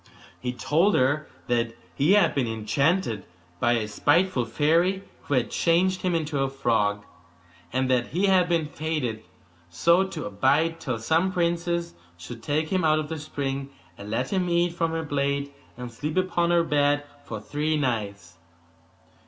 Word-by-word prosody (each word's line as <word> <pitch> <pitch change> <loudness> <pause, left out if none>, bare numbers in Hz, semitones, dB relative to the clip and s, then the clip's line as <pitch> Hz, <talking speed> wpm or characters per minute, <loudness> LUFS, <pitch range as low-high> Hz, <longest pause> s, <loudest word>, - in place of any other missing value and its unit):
He 125 - -3
told 165 +10 +2
her 145 +4 +1 0.2
that 115 -1 -1 0.2
he 150 +7 +3
had 205 - +4
been 130 -4 0
enchanted 115 - 0 0.4
by 120 - +3
a 110 -3 0
spiteful 145 - +2
fairy, 170 +9 +1 0.2
who 145 - 0
had 125 -3 0
changed 180 +2 +2
him 180 -2 0
into 155 -3 -1
a 135 0 +1
frog; 110 -6 0 0.7
and 130 0 0
that 125 -2 +2
he 185 +4 0
had 185 -2 +3
been 165 -2 +1
fated 145 -8 -3 0.5
so 170 - +3
to - - -6
abide 140 +11 +1
till 125 -7 -3
some 160 +11 +1
princess 170 -1 -1 0.2
should 115 +7 -9
take 155 +5 -1
him 185 -2 0
out 155 -1 +4
of 155 -1 -3
the 160 -1 -4
spring, 140 -2 -4 0.3
and 100 +2 -10
let 125 - -2
him 185 -2 0
eat 170 0 +2
from 165 -1 0
her 160 0 -3
plate, 140 -1 -1 0.2
and 125 -1 -7
sleep 150 +8 -4
upon 175 -2 +1
her 170 -1 +4
bed 145 -2 +2 0.2
for 110 -5 -6
three 150 +6 -1
nights. 105 - -3
145 Hz, 165 wpm, -25 LUFS, 125-170 Hz, 0.7 s, had